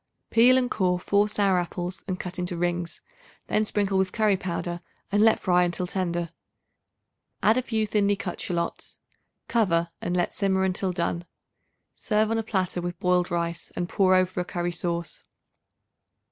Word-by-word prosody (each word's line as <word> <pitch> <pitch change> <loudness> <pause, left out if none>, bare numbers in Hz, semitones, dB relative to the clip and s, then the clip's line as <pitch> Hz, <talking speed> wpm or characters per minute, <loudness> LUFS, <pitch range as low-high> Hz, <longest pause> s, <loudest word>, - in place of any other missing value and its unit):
Peel 245 +3 +6
and 250 -1 +1
core 180 -3 +1
4 205 +3 +2
sour 200 -3 +2
apples 175 +1 -4
and 185 -2 -3
cut 180 0 -5
into 180 -1 -2
rings; 175 -1 -2 0.4
then 215 - +1
sprinkle 200 -2 0
with 190 -1 +1
curry 215 -3 +3
powder 175 -2 -4 0.3
and 205 +1 +3
let 220 0 +5
fry 180 -1 +3
until 175 +1 -1
tender. 175 -2 -2 1.1
Add 220 - +5
a 255 - +2
few 220 -3 -1
thinly 205 -1 +2
cut - - -5
shallots. 170 -2 -3 0.5
Cover 170 -7 +1
and 180 - -1
let 175 - 0
simmer 190 -1 +1
until 190 0 0
done. 170 -1 -2 0.7
Serve 215 0 +1
on 225 - +1
a - - +1
platter 190 -5 -1
with 175 +1 -4
boiled 180 -1 +2
rice 170 -1 -3
and 175 - -2
pour 185 0 +3
over 185 0 +1
a - - +1
curry 175 0 -2
sauce. 170 -1 -3
185 Hz, 165 wpm, -26 LUFS, 175-205 Hz, 1.1 s, Peel